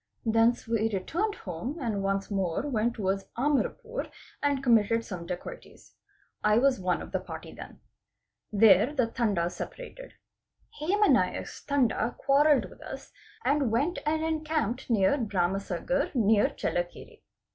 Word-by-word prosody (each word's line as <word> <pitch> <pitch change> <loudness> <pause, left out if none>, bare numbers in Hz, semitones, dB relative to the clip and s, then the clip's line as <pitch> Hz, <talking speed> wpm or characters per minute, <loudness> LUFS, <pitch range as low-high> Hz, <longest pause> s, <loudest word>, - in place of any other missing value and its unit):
Thence 225 +1 +2
we 225 -1 +1
returned 350 - -1
home 185 - -5
and 225 -7 -2
once 195 +1 -1
more 190 -2 -1
went 235 -3 0
towards 195 -2 -2
Amarapur 375 - -1 0.3
and 285 -2 0
committed 230 -2 +3
some 175 -4 -7
dacoities. 185 - -8 0.5
I 210 0 +4
was 265 +1 +3
one 180 -2 0
of - - -11
the 190 - 0
party 185 - -8
then. - - -11 0.7
There 215 +5 +5
the 255 -4 +3
Tandas 205 -7 -1
separated. - - -8 0.7
Hema 405 +7 +3
Naik's - - 0
Tanda 245 -4 +1
quarrelled 285 +1 +3
with - - -16
us - - -9 0.3
and 285 -3 +2
went 280 +10 0
and 315 +1 0
encamped 310 -7 -1
near 215 +4 +3
Bharamsagar 200 - -1
near 215 -3 +4
Chellakere. 175 0 -4
230 Hz, 135 wpm, -28 LUFS, 195-285 Hz, 0.7 s, There